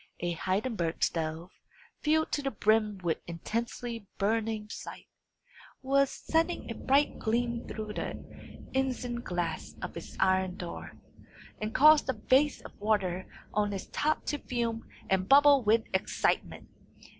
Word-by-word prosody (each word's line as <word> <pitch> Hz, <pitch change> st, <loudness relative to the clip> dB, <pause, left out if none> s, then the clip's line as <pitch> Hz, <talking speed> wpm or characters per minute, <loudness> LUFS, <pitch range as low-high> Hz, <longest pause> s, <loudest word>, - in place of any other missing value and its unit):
A 175 Hz, -, -1 dB
Heidenberg 185 Hz, -1 st, -1 dB
stove, 165 Hz, +2 st, -1 dB, 0.5 s
filled 315 Hz, +1 st, +2 dB
to 290 Hz, -, 0 dB
the 275 Hz, -, -1 dB
brim 215 Hz, -2 st, +2 dB
with 170 Hz, -2 st, 0 dB
intensely 230 Hz, +5 st, -4 dB
burning 220 Hz, +1 st, 0 dB
anthracite, 210 Hz, -, -9 dB, 0.8 s
was 275 Hz, +1 st, +3 dB
sending 330 Hz, -5 st, -1 dB
a -, -, -2 dB
bright 280 Hz, +5 st, +2 dB
gleam 235 Hz, +1 st, -1 dB
through 215 Hz, -1 st, -5 dB
the -, -, -3 dB, 0.6 s
isinglass 240 Hz, -9 st, -2 dB
of -, -, -6 dB
its -, -, -8 dB
iron 185 Hz, -1 st, +2 dB
door, 175 Hz, -1 st, -7 dB, 0.7 s
and 215 Hz, +1 st, -3 dB
causing 305 Hz, +1 st, +7 dB
the 260 Hz, -, +1 dB
vase 275 Hz, +4 st, +2 dB
of -, -, -12 dB
water 195 Hz, -4 st, 0 dB, 0.3 s
on 205 Hz, -1 st, +1 dB
its 195 Hz, -, -6 dB
top 310 Hz, +1 st, 0 dB
to 295 Hz, -, -2 dB
fume 235 Hz, -3 st, -3 dB, 0.2 s
and 190 Hz, 0 st, +1 dB
bubble 285 Hz, 0 st, +7 dB
with 220 Hz, +1 st, +4 dB
excitement. 190 Hz, -, 0 dB
225 Hz, 135 wpm, -30 LUFS, 190-265 Hz, 0.8 s, causing